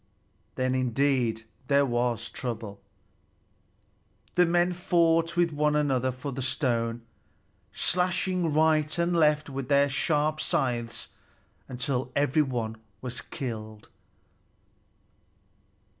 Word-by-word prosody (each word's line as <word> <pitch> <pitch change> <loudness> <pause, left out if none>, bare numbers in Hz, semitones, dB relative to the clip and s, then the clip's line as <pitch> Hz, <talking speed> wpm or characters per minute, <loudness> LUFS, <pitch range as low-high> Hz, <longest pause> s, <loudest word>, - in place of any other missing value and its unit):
Then 130 0 0
indeed 125 -2 +1 0.2
there 140 0 +4
was 120 -2 -1
trouble! 110 -5 -6 1.5
The 180 -1 +4
men 175 +1 +2
fought 170 -2 +2
with 175 -1 +3
one 150 0 +1
another 130 -4 +1
for 130 +3 -6
the 135 +1 -4
stone, 120 -3 -1 0.7
slashing 180 -1 0
right 155 0 +2
and 170 +1 +1
left 150 -2 +3
with 135 -2 -5
their 140 0 +4
sharp 150 +2 0
scythes 125 -8 -2 0.6
until 125 0 -2
every 145 +2 +3
one 120 -6 -2 0.2
was 125 +1 -3
killed. 110 -6 -7
140 Hz, 100 wpm, -27 LUFS, 125-155 Hz, 1.5 s, there